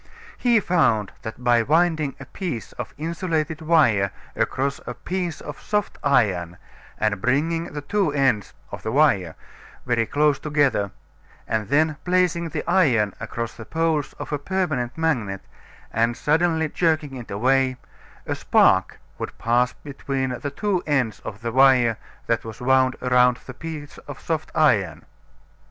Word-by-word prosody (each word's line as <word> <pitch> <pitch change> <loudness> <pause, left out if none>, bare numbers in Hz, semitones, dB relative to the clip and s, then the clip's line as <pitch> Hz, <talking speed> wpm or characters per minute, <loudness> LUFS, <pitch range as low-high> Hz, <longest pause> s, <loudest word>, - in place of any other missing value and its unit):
He 240 -3 +3
found 135 - +2
that 110 +3 -8
by 120 -1 +4
winding 155 +1 +1
a 135 - -8
piece 165 - -5
of - - -7
insulated 160 -1 -2
wire 140 -12 +3 0.3
around 140 +1 -1
a 125 - -4
piece 180 -3 -4
of 150 0 -8
soft 210 -1 -2
iron 95 -11 +1 0.4
and 105 -3 0
bringing 160 +7 +1
the 150 -3 -6
two 195 0 +1
ends 135 - +1 0.2
(of - - -7
the 110 - -3
wire) 100 - +3 0.5
very 115 -2 +1
close 145 -1 +2
together, 145 -9 +1 0.6
and 110 -2 -1
then 155 +4 +2
placing 180 -2 +1
the 155 - -5
iron 130 - +3
across 115 0 -4
the 115 - -10
poles 160 +2 -1
of - - -8
a 150 - -1
permanent 145 -8 -2
magnet 120 -13 -1 0.5
and 115 +1 +1
suddenly 160 +3 +2
jerking 155 -3 0
it 120 -3 -8
away, 130 +4 +2 0.5
a - - -2
spark - - +3 0.2
would - - -6
pass 120 +2 +2
between 135 -2 -4
the 145 - -3
two 190 +5 -1
ends 130 -8 0
of 105 +1 -8
the 115 -1 -3
wire 125 -3 +5 0.3
that 115 - 0
was 110 -1 -8
wound 130 0 +3
around 125 -1 +4
the 130 - -8
piece 150 0 -8
of - - -8
soft 160 -2 -3
iron. 95 - +2
140 Hz, 150 wpm, -23 LUFS, 115-160 Hz, 0.6 s, wire